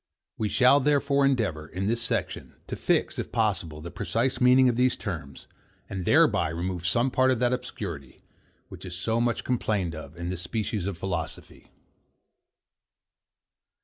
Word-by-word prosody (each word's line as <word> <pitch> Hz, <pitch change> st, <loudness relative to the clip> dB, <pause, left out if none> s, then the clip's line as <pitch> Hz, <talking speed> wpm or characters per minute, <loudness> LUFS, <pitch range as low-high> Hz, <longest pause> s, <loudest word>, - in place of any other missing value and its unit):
We 105 Hz, -, -2 dB
shall, 130 Hz, +4 st, +5 dB
therefore, 140 Hz, 0 st, +2 dB
endeavour, 105 Hz, -, -1 dB
in 95 Hz, +4 st, -4 dB
this 115 Hz, +3 st, 0 dB
section, 115 Hz, -, -3 dB
to -, -, -5 dB
fix, -, -, 0 dB
if -, -, -4 dB
possible, 75 Hz, -2 st, -1 dB
the 85 Hz, +2 st, -7 dB
precise 125 Hz, +3 st, -1 dB
meaning 125 Hz, +1 st, +6 dB
of 120 Hz, -, +2 dB
these 125 Hz, +1 st, +2 dB
terms, 80 Hz, -, -6 dB, 0.4 s
and 95 Hz, -2 st, -5 dB
thereby -, -, +4 dB
remove 90 Hz, +2 st, -3 dB
some 120 Hz, +7 st, +2 dB
part 130 Hz, +1 st, +3 dB
of 130 Hz, -, +2 dB
that 125 Hz, +1 st, +1 dB
obscurity, 85 Hz, -, -6 dB, 0.4 s
which -, -, -11 dB
is 90 Hz, -2 st, -6 dB
so 115 Hz, +5 st, 0 dB
much 120 Hz, -1 st, 0 dB
complained 105 Hz, -8 st, -1 dB
of 80 Hz, 0 st, -9 dB
in 85 Hz, +1 st, -4 dB
this 90 Hz, -1 st, -4 dB
species 105 Hz, +1 st, -3 dB
of 100 Hz, -4 st, -4 dB
philosophy. 85 Hz, -2 st, -5 dB
105 Hz, 155 wpm, -27 LUFS, 85-125 Hz, 0.4 s, meaning